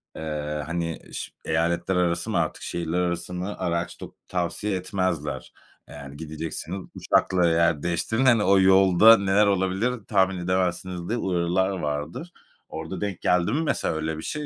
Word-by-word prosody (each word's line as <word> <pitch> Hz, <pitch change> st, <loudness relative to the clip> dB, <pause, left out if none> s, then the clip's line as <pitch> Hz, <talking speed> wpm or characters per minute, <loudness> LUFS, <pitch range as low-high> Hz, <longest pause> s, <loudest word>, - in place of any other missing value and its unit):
eee, 75 Hz, -1 st, -4 dB
hani, 85 Hz, 0 st, -3 dB
ş -, -, -5 dB
eyaletler 85 Hz, +3 st, 0 dB
arası 85 Hz, -1 st, 0 dB
mı -, -, 0 dB
artık, -, -, -1 dB
şehirler 85 Hz, 0 st, -2 dB
arası 85 Hz, 0 st, -2 dB
mı 90 Hz, +3 st, -4 dB
araç 85 Hz, -1 st, -2 dB
tu -, -, -10 dB
tavsiye 90 Hz, +3 st, -2 dB
etmezler. 90 Hz, -5 st, -3 dB, 0.4 s
Eee, -, -, -11 dB
yani, 70 Hz, 0 st, -10 dB
gidecekseniz 80 Hz, +4 st, -5 dB, 0.2 s
uçakla 90 Hz, -2 st, +2 dB
yer 80 Hz, -2 st, +2 dB
değiştirin, 110 Hz, +9 st, 0 dB
hani, 115 Hz, -5 st, +5 dB
o 95 Hz, 0 st, +5 dB
yolda 95 Hz, +3 st, +7 dB
neler 100 Hz, +1 st, +3 dB
olabilir, 95 Hz, +4 st, +1 dB, 0.2 s
tahmin 95 Hz, -3 st, +2 dB
edemezsiniz 90 Hz, 0 st, -2 dB
diye 120 Hz, -, 0 dB
uyarılar 90 Hz, -1 st, 0 dB
vardır. 80 Hz, -, -4 dB, 0.4 s
Orada 80 Hz, +4 st, -6 dB
denk 100 Hz, -3 st, -3 dB
geldi 90 Hz, -1 st, +2 dB
mi 150 Hz, -, +1 dB
mesela 165 Hz, -, 0 dB
öyle 80 Hz, 0 st, -3 dB
bir 80 Hz, -, -7 dB
şey 150 Hz, -1 st, -4 dB
90 Hz, 160 wpm, -25 LUFS, 80-95 Hz, 0.4 s, yolda